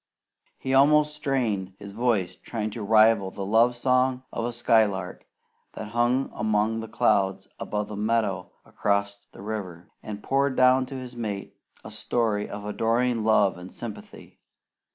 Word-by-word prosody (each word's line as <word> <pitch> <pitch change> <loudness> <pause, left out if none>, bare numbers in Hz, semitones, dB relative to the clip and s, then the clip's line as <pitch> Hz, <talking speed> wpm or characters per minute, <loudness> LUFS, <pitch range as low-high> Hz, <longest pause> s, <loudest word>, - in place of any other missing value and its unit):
He 130 - -3
almost 150 +2 +4
strained 115 -10 -1
his 100 0 -10
voice 110 -4 0
trying 110 -2 -5
to 110 - -6
rival 110 -1 +4
the 95 +1 -6
love 115 +4 +3
song 130 +1 +1
of 115 - -2
a 120 - -2
skylark 110 -6 +1 0.5
that 110 - -7
hung 120 +4 +1
among 110 +1 0
the 115 - -6
clouds 95 -2 +1
above 105 0 -3
a - - -5
meadow 105 -3 -1
across 100 0 -1
the 95 - -12
river, 95 -5 -6
and 105 -1 -7
poured 135 0 +1
down 130 0 +4
to 135 - -8
his 125 -1 -7
mate 105 -4 -5 0.3
a - - -9
story 110 -4 -1
of 105 0 -7
adoring 115 +2 0
love 105 -4 +3
and 90 +1 -10
sympathy. 115 -3 -10
110 Hz, 155 wpm, -26 LUFS, 100-125 Hz, 0.5 s, almost